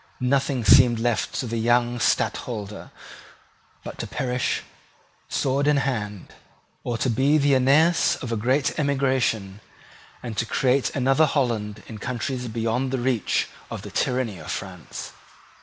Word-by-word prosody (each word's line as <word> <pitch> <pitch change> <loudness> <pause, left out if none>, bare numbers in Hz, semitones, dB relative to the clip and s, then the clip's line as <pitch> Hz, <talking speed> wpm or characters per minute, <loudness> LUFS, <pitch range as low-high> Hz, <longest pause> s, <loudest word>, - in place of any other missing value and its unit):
Nothing 135 -1 0
seemed 120 +1 +7
left 120 -1 -1
to - - -2
the 115 -1 -3
young 120 +1 +2
Stadtholder 105 -3 -1 0.9
but - - -8
to - - -4
perish 125 0 -1 0.7
sword 140 +1 0
in 150 -1 +4
hand, 105 -8 -3 0.5
or 120 -2 -2
to 130 - -1
be 135 +5 +3
the 145 -1 +3
Aeneas 145 +6 +4
of 125 -5 -6
a - - 0
great 130 +8 0
emigration, 130 -8 0 0.6
and 120 -3 -5
to 115 - +1
create 130 +2 +2
another 135 +3 +3
Holland 110 -7 -1
in 110 -2 -9
countries 125 +2 -3
beyond 115 +3 -1
the 135 - -1
reach 120 -3 0 0.2
of - - -6
the - - -8
tyranny 125 -7 -1
of 75 - -10
France. 90 -4 -6
125 Hz, 140 wpm, -24 LUFS, 115-135 Hz, 0.9 s, seemed